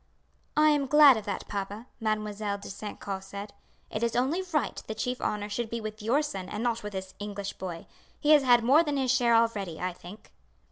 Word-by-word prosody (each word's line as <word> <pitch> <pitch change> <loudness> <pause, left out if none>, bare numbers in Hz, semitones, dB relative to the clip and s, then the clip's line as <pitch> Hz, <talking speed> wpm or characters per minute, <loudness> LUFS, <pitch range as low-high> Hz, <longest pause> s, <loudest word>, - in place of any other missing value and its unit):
"I 305 0 +6
am 285 -2 +1
glad 295 -1 +8
of 215 -2 -5
that, 200 - -4
papa," 205 +3 -5
Mademoiselle 215 -2 -2
de 200 - -9
St. 205 +1 -7
Caux 195 -1 -4
said; 200 +1 -8 0.4
"it 215 - -3
is 235 -1 0
only 270 +9 +1
right 300 -7 -1
the 220 - -4
chief 250 +3 -3
honour 210 -1 -1
should 220 +2 -3
be 235 - -3
with 215 0 -6
your 250 +8 +2
son 195 -10 -5
and 210 +2 -4
not 235 -1 0
with 210 0 -7
this 190 0 -6
English 205 -1 -5
boy. 175 -3 -7 0.3
He 300 - +3
has 300 -2 +8
had 245 -3 +5
more 275 +7 +6
than 295 -4 -1
his 260 -2 +1
share 240 -3 +4
already, 205 -7 +1
I 180 0 -2
think." 180 +4 -13
215 Hz, 220 wpm, -28 LUFS, 200-250 Hz, 0.4 s, glad